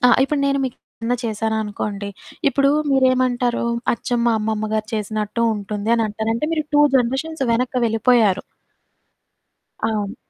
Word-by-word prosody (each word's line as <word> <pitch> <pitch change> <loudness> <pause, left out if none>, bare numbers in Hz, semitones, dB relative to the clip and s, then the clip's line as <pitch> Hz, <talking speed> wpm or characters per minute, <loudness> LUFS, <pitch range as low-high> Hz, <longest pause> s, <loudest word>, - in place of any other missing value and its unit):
ఆ! - - +6 0.2
ఇప్పుడు 285 +1 -1
నేను 275 0 +2
మీకేదన్నా 245 -1 -4
చేశాననుకోండి, 210 -2 -2 0.4
ఇప్పుడు 275 0 +2 0.2
మీరేమంటారు, 255 -2 +2 0.3
అచ్చం 240 0 -2
మా 235 - +4
అమ్మమ్మ 215 0 -2
గారు 215 0 -1
చేసినట్టు 215 +1 -2
ఉంటుంది 210 +1 -3
అనంటారు, 220 0 -1
అంటే 235 +7 -1
మీరు 310 -2 0
2 290 - +6 0.2
జనరేషన్స్ 270 +5 -1
వెనక్కి 250 +2 0
వెళ్ళిపోయారు. 225 -3 +3 1.4
అవును. 215 -2 -1
230 Hz, 120 wpm, -21 LUFS, 215-255 Hz, 1.4 s, ఆ